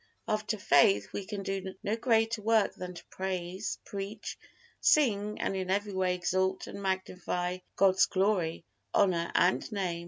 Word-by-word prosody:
After 215 Hz, 0 st, -1 dB
faith 105 Hz, -, +4 dB
we 200 Hz, -, -4 dB
can 200 Hz, -1 st, -4 dB
do 190 Hz, -1 st, -4 dB
no 210 Hz, -, 0 dB
greater 225 Hz, -1 st, +2 dB
work 220 Hz, 0 st, +3 dB
than 180 Hz, -1 st, -7 dB
to -, -, -11 dB
praise, 185 Hz, +1 st, -3 dB
preach, 200 Hz, +2 st, -5 dB, 0.4 s
sing 210 Hz, -8 st, +3 dB
and -, -, -1 dB
in 185 Hz, -1 st, -3 dB
every 200 Hz, +1 st, 0 dB
way 185 Hz, -1 st, +1 dB
exalt 185 Hz, +1 st, 0 dB
and 200 Hz, -, -8 dB
magnify 185 Hz, -1 st, -2 dB, 0.2 s
God's 190 Hz, -1 st, +5 dB
glory, 185 Hz, -4 st, 0 dB, 0.3 s
honor 170 Hz, -3 st, +2 dB
and 185 Hz, +5 st, +2 dB
Name. 185 Hz, -5 st, -2 dB
190 Hz, 150 wpm, -30 LUFS, 180-210 Hz, 0.4 s, God's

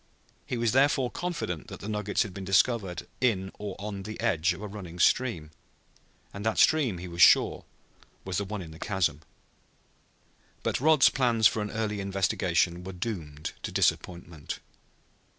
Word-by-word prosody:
He 125 Hz, -, -2 dB
was 115 Hz, -1 st, +1 dB
therefore 135 Hz, 0 st, +3 dB
confident 170 Hz, -, -4 dB
that -, -, -9 dB
the 100 Hz, -, -8 dB
nuggets 105 Hz, -1 st, 0 dB
had 100 Hz, -, -8 dB
been 95 Hz, -, -7 dB
discovered 95 Hz, 0 st, +1 dB
in 95 Hz, -7 st, +1 dB
or 105 Hz, -2 st, -5 dB
on 100 Hz, -1 st, -5 dB
the 110 Hz, +3 st, -7 dB
edge 95 Hz, -6 st, +2 dB
of 90 Hz, -, -5 dB
a -, -, -4 dB
running 95 Hz, -4 st, -9 dB
stream. 90 Hz, -5 st, +1 dB, 0.8 s
And 100 Hz, -, -6 dB
that 110 Hz, 0 st, 0 dB
stream, 140 Hz, -, +4 dB
he 90 Hz, +1 st, -7 dB
was 85 Hz, 0 st, -4 dB
sure, -, -, +5 dB, 0.6 s
was 95 Hz, -2 st, -2 dB
the 100 Hz, -, 0 dB
one 100 Hz, -1 st, -5 dB
in 80 Hz, -, -10 dB
the 80 Hz, -, -12 dB
chasm. 85 Hz, -8 st, 0 dB, 1.4 s
But -, -, -1 dB
Rod's 155 Hz, -1 st, +6 dB
plans 120 Hz, -4 st, +1 dB
for 110 Hz, -, +4 dB
an 105 Hz, -, -3 dB
early 105 Hz, -1 st, -2 dB
investigation 90 Hz, -3 st, 0 dB
were 95 Hz, +1 st, -7 dB
doomed 85 Hz, -7 st, -5 dB
to -, -, -5 dB
disappointment. 85 Hz, -4 st, -1 dB
100 Hz, 165 wpm, -28 LUFS, 90-110 Hz, 1.4 s, Rod's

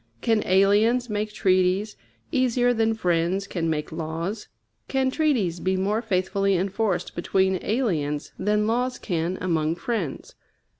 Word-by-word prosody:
Can 225 Hz, -3 st, +2 dB
aliens 210 Hz, +6 st, +3 dB
make 210 Hz, 0 st, -2 dB
treaties 190 Hz, 0 st, +1 dB, 0.4 s
easier 245 Hz, -1 st, +2 dB
than 225 Hz, -1 st, +1 dB
friends 180 Hz, 0 st, 0 dB
can 170 Hz, -4 st, -2 dB
make 150 Hz, -1 st, -2 dB
laws? 165 Hz, +6 st, -4 dB, 0.4 s
Can 265 Hz, -1 st, +1 dB
treaties 245 Hz, -, +1 dB
be 185 Hz, +2 st, 0 dB
more 205 Hz, +4 st, 0 dB
faithfully 195 Hz, -2 st, 0 dB
enforced 190 Hz, 0 st, -1 dB
between 190 Hz, +1 st, +1 dB
aliens 160 Hz, -, -1 dB
than 210 Hz, +1 st, +1 dB
laws 245 Hz, +3 st, 0 dB
can 175 Hz, -1 st, -2 dB
among 165 Hz, -3 st, 0 dB
friends? 180 Hz, -, -4 dB
195 Hz, 130 wpm, -25 LUFS, 175-225 Hz, 0.4 s, aliens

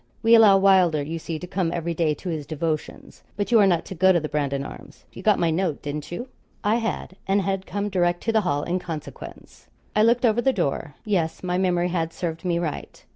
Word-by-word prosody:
We 225 Hz, +1 st, +5 dB
allow 215 Hz, -4 st, +8 dB
Wylder, 185 Hz, -6 st, +4 dB
you 165 Hz, +3 st, -4 dB
see, 160 Hz, 0 st, -5 dB
to 180 Hz, -, -7 dB
come 180 Hz, -2 st, -1 dB
every 170 Hz, 0 st, -2 dB
day 160 Hz, -2 st, +1 dB
to 185 Hz, -, -7 dB
his 155 Hz, -4 st, -4 dB
devotions. 155 Hz, 0 st, -4 dB, 0.2 s
But 205 Hz, +3 st, -2 dB
you 230 Hz, -, +6 dB
are 200 Hz, -, +6 dB
not 175 Hz, -3 st, +1 dB
to -, -, -7 dB
go 190 Hz, +2 st, +4 dB
to 175 Hz, -, +3 dB
the 155 Hz, -1 st, -5 dB
Brandon 140 Hz, -2 st, -1 dB
Arms -, -, -12 dB
you -, -, -9 dB
got 210 Hz, +1 st, +3 dB
my 170 Hz, -1 st, +1 dB
note, 165 Hz, -2 st, -1 dB
didn't 145 Hz, +1 st, -5 dB
you?' 240 Hz, +9 st, -5 dB, 0.4 s
I 215 Hz, +2 st, +2 dB
had, 225 Hz, -4 st, -4 dB
and 195 Hz, +1 st, +2 dB
had 195 Hz, 0 st, -2 dB
come 200 Hz, +2 st, -2 dB
direct 175 Hz, -3 st, 0 dB
to 225 Hz, -, +1 dB
the 220 Hz, -1 st, +3 dB
Hall 145 Hz, -6 st, -1 dB
in 180 Hz, +2 st, -1 dB
consequence. 165 Hz, -4 st, -9 dB, 0.3 s
I 210 Hz, -, +4 dB
looked 235 Hz, +3 st, +4 dB
over 230 Hz, +1 st, +3 dB
the 265 Hz, +2 st, +2 dB
door. 145 Hz, -, -2 dB
Yes, 175 Hz, -7 st, -1 dB
my 180 Hz, 0 st, -1 dB
memory 180 Hz, -1 st, +1 dB
had 165 Hz, -2 st, -2 dB
served 165 Hz, -2 st, -4 dB
me 175 Hz, -2 st, 0 dB
right. 165 Hz, -4 st, -5 dB
180 Hz, 235 wpm, -24 LUFS, 160-195 Hz, 0.4 s, allow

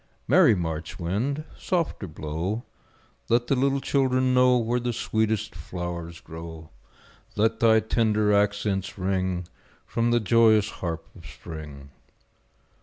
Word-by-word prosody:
Merry -, -, +6 dB
March 80 Hz, -2 st, -4 dB
wind, 110 Hz, -, -2 dB
softer 170 Hz, -, -2 dB
blow, 80 Hz, +8 st, -4 dB, 0.7 s
Let 120 Hz, +1 st, +3 dB
the 135 Hz, -, +1 dB
little 135 Hz, +1 st, +1 dB
children 130 Hz, -2 st, +1 dB
know 125 Hz, 0 st, +5 dB
Where 120 Hz, +1 st, 0 dB
the 120 Hz, 0 st, -2 dB
sweetest 110 Hz, -1 st, -1 dB
flowers 85 Hz, -1 st, -6 dB
grow; 80 Hz, -1 st, -9 dB, 0.6 s
Let 110 Hz, +2 st, +1 dB
thy 110 Hz, -1 st, +5 dB
tender 110 Hz, -1 st, +2 dB
accents 100 Hz, -1 st, 0 dB
ring 95 Hz, -2 st, -1 dB, 0.4 s
From 115 Hz, 0 st, 0 dB
the 120 Hz, 0 st, +3 dB
joyous 110 Hz, -1 st, +4 dB
harp 85 Hz, -2 st, -4 dB
of -, -, -12 dB
Spring. 75 Hz, -4 st, -10 dB
105 Hz, 120 wpm, -26 LUFS, 85-120 Hz, 0.7 s, Merry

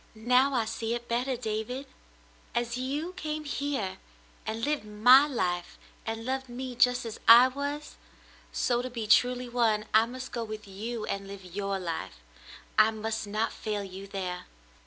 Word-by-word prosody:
"Now 250 Hz, +5 st, +3 dB
I 230 Hz, -3 st, +2 dB
see 225 Hz, +1 st, -2 dB
it 240 Hz, 0 st, -6 dB
better, 245 Hz, +2 st, 0 dB
David. 230 Hz, +3 st, -3 dB, 0.7 s
As 240 Hz, 0 st, 0 dB
you 285 Hz, +8 st, -3 dB
came 310 Hz, -4 st, -4 dB
here 275 Hz, -10 st, -2 dB, 0.5 s
and 225 Hz, +1 st, -2 dB
lived 295 Hz, -3 st, 0 dB
my 245 Hz, +7 st, +6 dB
life, 175 Hz, -10 st, -2 dB, 0.3 s
and 225 Hz, 0 st, -3 dB
loved 265 Hz, 0 st, -2 dB
me 250 Hz, +1 st, -5 dB
just 250 Hz, +1 st, +3 dB
as 225 Hz, -, -6 dB
I 235 Hz, +3 st, +10 dB
was 285 Hz, +2 st, -5 dB, 0.3 s
— -, -, -26 dB, 0.2 s
so 240 Hz, -1 st, +2 dB
to 255 Hz, -, -4 dB
be 235 Hz, -3 st, -4 dB
truly 250 Hz, +3 st, +4 dB
one, 230 Hz, -3 st, +1 dB
I 220 Hz, +1 st, +6 dB
must 255 Hz, +2 st, -7 dB
go 235 Hz, -, -2 dB
with 215 Hz, -1 st, -7 dB
you 215 Hz, +3 st, -5 dB
and 195 Hz, 0 st, -4 dB
live 195 Hz, -1 st, -9 dB
your 195 Hz, +2 st, -2 dB
life. 165 Hz, -, -4 dB, 0.6 s
I 215 Hz, 0 st, +7 dB
must 220 Hz, -1 st, -3 dB
not 215 Hz, +2 st, -1 dB
fail 210 Hz, -2 st, -3 dB
you 195 Hz, 0 st, -8 dB
there.' 185 Hz, -2 st, -4 dB
230 Hz, 170 wpm, -29 LUFS, 210-255 Hz, 0.7 s, I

